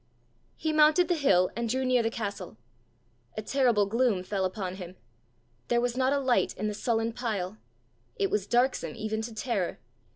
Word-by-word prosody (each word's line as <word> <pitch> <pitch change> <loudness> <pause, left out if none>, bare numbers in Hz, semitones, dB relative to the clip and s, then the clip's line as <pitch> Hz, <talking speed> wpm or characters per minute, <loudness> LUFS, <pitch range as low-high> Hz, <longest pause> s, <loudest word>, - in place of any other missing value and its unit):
He 315 0 -2
mounted 310 +4 +5
the - - +4
hill 190 - +3
and 235 0 -2
drew 260 +3 0
near 255 -1 +3
the 225 - 0
castle. 210 -3 -5 0.8
A 215 - -3
terrible 240 -4 +2
gloom 220 -3 +1
fell 190 0 -1
upon 185 -1 -4
him: 180 -1 -8 0.7
there 240 - +2
was 245 0 -1
not 260 +1 +2
a 285 - +2
light 260 -3 +1
in 215 - -2
the 210 - -2
sullen 225 +1 -1
pile! 215 -4 -3 0.6
It 395 -1 0
was 205 -1 0
darksome 245 +4 +1
even 220 0 -3
to 225 +1 -5
terror! 215 -6 -2
230 Hz, 175 wpm, -28 LUFS, 205-255 Hz, 0.8 s, mounted